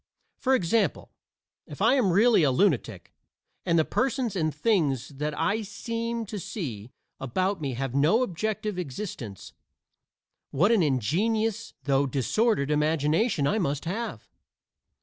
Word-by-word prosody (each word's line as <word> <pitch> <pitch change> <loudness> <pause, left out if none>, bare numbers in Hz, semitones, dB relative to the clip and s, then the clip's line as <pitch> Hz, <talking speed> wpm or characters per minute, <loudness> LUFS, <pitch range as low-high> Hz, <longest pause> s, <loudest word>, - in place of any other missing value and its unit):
For 265 0 +3
example, 200 - 0 0.6
if 145 - -10
I 225 +5 +4
am 245 -9 +3
really 215 +3 +5
a 145 - +4
lunatic, 125 - 0 0.5
and 170 -1 +3
the 160 - +3
persons 255 -4 -1
and 155 -4 0
things 150 - 0
that 150 +1 -4
I 205 +7 +1
seem 230 +2 -4
to 205 0 -6
see 145 - -6 0.3
about 185 +9 -1
me 135 -4 -2
have 135 0 -3
no 155 - +3
objective 210 0 -3
existence, 135 - -6 1.0
what 175 +11 +2
an 225 -5 +4
ingenious 210 - 0
though 140 0 +2
disordered 145 - +1
imagination 150 - +1
I 210 +9 +1
must 145 -5 -2
have! 220 +8 -4
175 Hz, 130 wpm, -27 LUFS, 140-220 Hz, 1.0 s, really